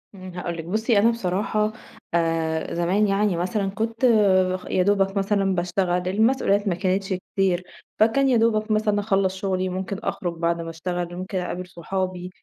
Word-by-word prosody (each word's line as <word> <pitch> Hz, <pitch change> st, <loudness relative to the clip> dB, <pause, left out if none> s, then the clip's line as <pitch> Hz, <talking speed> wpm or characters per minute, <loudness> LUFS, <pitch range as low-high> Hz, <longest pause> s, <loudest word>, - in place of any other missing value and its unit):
امم 185 Hz, -1 st, -9 dB
هاقول 175 Hz, -1 st, -4 dB
لِك 165 Hz, -, -6 dB
بُصّي 215 Hz, +4 st, +2 dB
أنا 225 Hz, -, +5 dB
بصراحة، 210 Hz, 0 st, -1 dB, 0.4 s
آآ 165 Hz, -1 st, 0 dB
زمان 185 Hz, +5 st, +2 dB
يعني 200 Hz, -2 st, +1 dB
مثلًا 195 Hz, +3 st, -1 dB
كنت 225 Hz, +4 st, -1 dB, 0.5 s
خ -, -, -14 dB
يا 185 Hz, -, +2 dB
دوبك 195 Hz, 0 st, +2 dB
مثلًا 195 Hz, -1 st, +1 dB
باشتغل، 180 Hz, 0 st, 0 dB
المسؤوليات 205 Hz, 0 st, +2 dB
ما 175 Hz, -, +1 dB
كانتش 190 Hz, +2 st, -1 dB
كتير، 185 Hz, -1 st, -1 dB, 0.4 s
فكان 250 Hz, +5 st, +4 dB
يا 250 Hz, -, +4 dB
دوبك 220 Hz, -1 st, +1 dB
مثلًا 215 Hz, -1 st, +2 dB
اخلّص 195 Hz, -2 st, +1 dB
شغلي، 185 Hz, -1 st, -1 dB
ممكن 190 Hz, +1 st, -4 dB
أخرج 175 Hz, -2 st, -2 dB
بعد 170 Hz, 0 st, 0 dB
ما 165 Hz, -, -6 dB
أشتغل، 175 Hz, +1 st, -4 dB
ممكن 185 Hz, +2 st, -4 dB
أقابل 180 Hz, 0 st, -4 dB
صحابي، 180 Hz, +1 st, -4 dB
190 Hz, 165 wpm, -24 LUFS, 180-210 Hz, 0.5 s, أنا